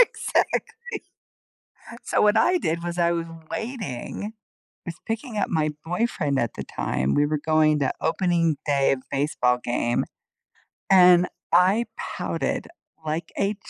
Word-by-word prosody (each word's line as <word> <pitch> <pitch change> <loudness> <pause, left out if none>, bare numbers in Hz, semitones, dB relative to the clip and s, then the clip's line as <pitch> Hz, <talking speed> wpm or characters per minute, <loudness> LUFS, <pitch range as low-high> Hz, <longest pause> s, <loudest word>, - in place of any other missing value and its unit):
Exactly. - - +2 1.4
So - - +1
what 210 +1 +4
I 360 +11 +4
did 170 - -2
was, 175 0 -4
I 170 -1 +3
was 170 -1 -2 0.2
waiting; 215 - -5 0.5
I - - -2
was 170 - -9
picking 225 +1 -4
up - - +1
my 155 -3 +1
boyfriend 160 - 0
at 115 -2 -1
the - - -6
time. 65 +1 -1
We 145 - +3
were 150 0 0
going 155 -1 +3
to 135 - +1
opening 170 -2 +1
day 140 -2 +3
of 130 -1 -2
baseball 135 -3 +1
game, 120 0 0 0.9
and 180 -2 +7 0.2
I 185 +6 +5
pouted - - -3 0.4
like 160 +2 -3
a 200 +1 +1
170 Hz, 140 wpm, -24 LUFS, 145-195 Hz, 1.4 s, and